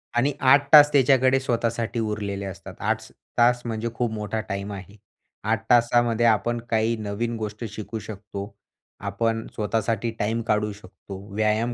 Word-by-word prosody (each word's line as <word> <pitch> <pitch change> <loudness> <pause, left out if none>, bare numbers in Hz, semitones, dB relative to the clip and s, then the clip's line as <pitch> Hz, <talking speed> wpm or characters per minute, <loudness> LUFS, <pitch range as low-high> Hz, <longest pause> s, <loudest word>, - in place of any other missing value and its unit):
आणि 125 +4 +3
8 140 +2 +4
तास 150 -1 +10
त्याच्याकडे 135 -1 +4
स्वतःसाठी 115 -2 -1
उरलेले 105 -2 -3
असतात, 95 0 -8
आठच - - -2 0.3
तास 120 +1 +4
म्हणजे 115 0 -2
खूप 120 -1 -1
मोठा 105 0 -3
टाईम 100 +1 -3
आहे. 100 +1 -10 0.5
8 - - 0
तासामध्ये 120 -1 +3
आपण 115 +1 +2
काही 110 +1 +1
नवीन 110 +2 -3
गोष्ट 105 +1 -5
शिकू 110 +2 -6
शकतो, 100 -1 -8 0.5
आपण 115 +3 -1
स्वतःसाठी 115 +1 -1
टाईम 110 +3 0
काढू 105 0 +1
शकतो, 100 -1 -11 0.2
व्यायाम 110 +2 +1
110 Hz, 145 wpm, -24 LUFS, 105-120 Hz, 0.5 s, तास